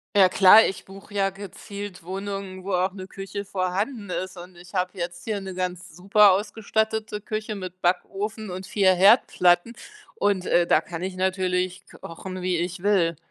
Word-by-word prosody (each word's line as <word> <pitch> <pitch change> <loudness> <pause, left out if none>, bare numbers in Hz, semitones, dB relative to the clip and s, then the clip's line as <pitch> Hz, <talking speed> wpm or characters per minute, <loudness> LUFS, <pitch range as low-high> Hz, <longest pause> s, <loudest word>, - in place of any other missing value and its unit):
Ja 190 -2 +6
klar, 205 +4 +7
ich 195 - -4
buche 195 +2 -13
ja 195 -1 +1
gezielt 200 0 -9
Wohnungen, 195 0 -6
wo 200 - -5
auch 185 +1 +1
'ne 190 -1 -8
Küche 195 +1 -7
vorhanden 200 +4 -2
ist, 185 +1 -4
und 180 +1 -11
ich 175 +2 -15
habe 180 +1 -2
jetzt 175 0 -5
hier 215 -2 -2
'ne 190 -1 -7
ganz 180 -2 -5
super 200 +2 +5
ausgestattete 220 +1 -1
Küche 215 0 -4
mit 185 -1 -8
Backofen 200 +4 -2
und 185 +1 -6
vier 190 -2 +3
Herdplatten 185 0 +4 0.4
und, 200 - 0
äh, 175 0 +3
da 155 - +3
kann 170 +1 -7
ich 190 0 -4
natürlich 185 -1 -1 0.2
kochen, 185 +2 -7
wie 180 -1 0
ich 175 +1 -3
will. 175 -6 +2
190 Hz, 170 wpm, -24 LUFS, 180-200 Hz, 0.4 s, klar